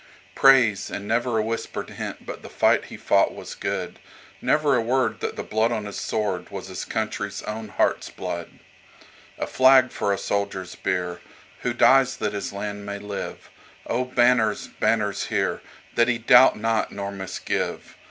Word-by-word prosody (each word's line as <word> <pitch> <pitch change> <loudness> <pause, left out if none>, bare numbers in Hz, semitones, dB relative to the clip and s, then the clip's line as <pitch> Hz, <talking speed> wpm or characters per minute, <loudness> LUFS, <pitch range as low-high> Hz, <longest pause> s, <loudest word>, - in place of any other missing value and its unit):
Praise, 125 -7 +5
and 100 - -6
never 120 +1 +1
a 110 - +2
whispered 115 +1 -4
hint - - -6
but - - -7
the - - -10
fight - - +2
he - - -10
fought - - +2
was - - -8
good; - - -4 0.4
Never 150 -2 +3
a 120 - +2
word 125 +3 0
that - - -3
the - - -4
blood 110 +2 +1
on 110 -3 -2
his 100 - -6
sword 95 -5 -2
was 95 -1 -7
his 95 - -5
country's 105 -2 -3
own 110 +1 -5
heart's 105 - 0
blood.A 85 -1 -9
flag 130 -1 +5
for 100 - -1
a 100 - +1
soldier's 95 -3 -3
bierWho 90 -1 -4
dies 135 -1 +5
that 105 - -2
his 100 - -4
land 100 0 -5
may 100 0 -5
live;O 105 +4 -6
banners, 120 -4 +2
banners - - +1
here, - - -1 0.3
That 120 0 +3
he 125 -1 +1
doubt 125 +3 +6
not 110 0 0
nor 100 0 -4
misgive! 95 -1 -4
110 Hz, 160 wpm, -24 LUFS, 100-120 Hz, 0.4 s, doubt